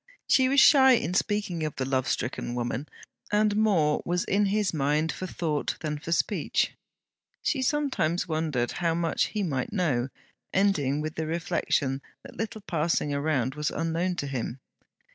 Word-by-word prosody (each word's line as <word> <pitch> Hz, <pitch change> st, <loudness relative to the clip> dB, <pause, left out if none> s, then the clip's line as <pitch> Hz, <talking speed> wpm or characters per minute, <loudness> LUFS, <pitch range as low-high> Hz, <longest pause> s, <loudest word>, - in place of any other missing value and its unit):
She 260 Hz, -1 st, +4 dB
was 275 Hz, +1 st, +4 dB
shy 265 Hz, -2 st, +7 dB
in 200 Hz, -7 st, +1 dB
speaking 205 Hz, -3 st, 0 dB
of 155 Hz, -2 st, -3 dB
the 130 Hz, -, -2 dB
love 130 Hz, -1 st, 0 dB
stricken 120 Hz, 0 st, -2 dB
woman, 120 Hz, +4 st, -3 dB, 0.4 s
and 210 Hz, 0 st, +3 dB
more 185 Hz, -9 st, +2 dB
was 175 Hz, +1 st, 0 dB
in 205 Hz, +1 st, +2 dB
his 205 Hz, -1 st, +1 dB
mind 150 Hz, +2 st, +1 dB
for 185 Hz, -, -5 dB
thought 155 Hz, -5 st, -2 dB
than 150 Hz, -2 st, -3 dB
for 165 Hz, -, -6 dB
speech. 170 Hz, -, +1 dB, 0.7 s
She 265 Hz, -, 0 dB
some 290 Hz, +2 st, +1 dB
times 170 Hz, -4 st, 0 dB
wondered 155 Hz, -7 st, -1 dB
how 165 Hz, -1 st, +2 dB
much 165 Hz, -1 st, +1 dB
he 210 Hz, -2 st, -3 dB
might 135 Hz, -8 st, -2 dB
know, 140 Hz, -, 0 dB, 0.4 s
ending 150 Hz, -8 st, +2 dB
with 155 Hz, 0 st, -3 dB
the 160 Hz, 0 st, -3 dB
reflection 145 Hz, -4 st, 0 dB, 0.2 s
that -, -, -12 dB
little 220 Hz, 0 st, -4 dB
passing 165 Hz, -5 st, 0 dB
around 140 Hz, -3 st, 0 dB
was 150 Hz, +1 st, -1 dB
unknown 165 Hz, +2 st, -1 dB
to 145 Hz, -, -3 dB
him. 130 Hz, -2 st, -4 dB
160 Hz, 165 wpm, -27 LUFS, 145-200 Hz, 0.7 s, shy